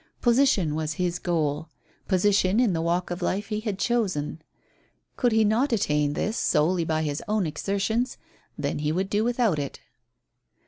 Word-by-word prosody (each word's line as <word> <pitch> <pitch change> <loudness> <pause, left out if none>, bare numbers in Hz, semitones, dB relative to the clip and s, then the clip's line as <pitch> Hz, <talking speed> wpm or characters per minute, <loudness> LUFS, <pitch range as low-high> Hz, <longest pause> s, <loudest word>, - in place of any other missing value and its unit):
Position 235 - +3
was 155 0 -2
his 180 +2 -1
goal 155 -3 -1 0.4
position 195 +1 +3
in 235 -7 +3
the 165 - -1
walk 175 +2 -1
of 175 +2 -4
life 195 +4 -1
he 210 -1 -1
had 215 -3 -3
chosen. 190 -10 -1 0.7
Could 245 -2 +2
he 220 0 +4
not 230 +7 +2
attain 150 -9 +1
this 215 +8 -1
solely 170 +3 +2
by 160 -1 0
his 145 -1 -2
own 210 -2 +1
exertions, 200 - -1 0.4
then - - -2
he 150 0 0
would 190 +4 -1
do 210 +1 +2
without 235 -8 +1
it. 140 -1 -5
185 Hz, 165 wpm, -26 LUFS, 160-215 Hz, 0.7 s, he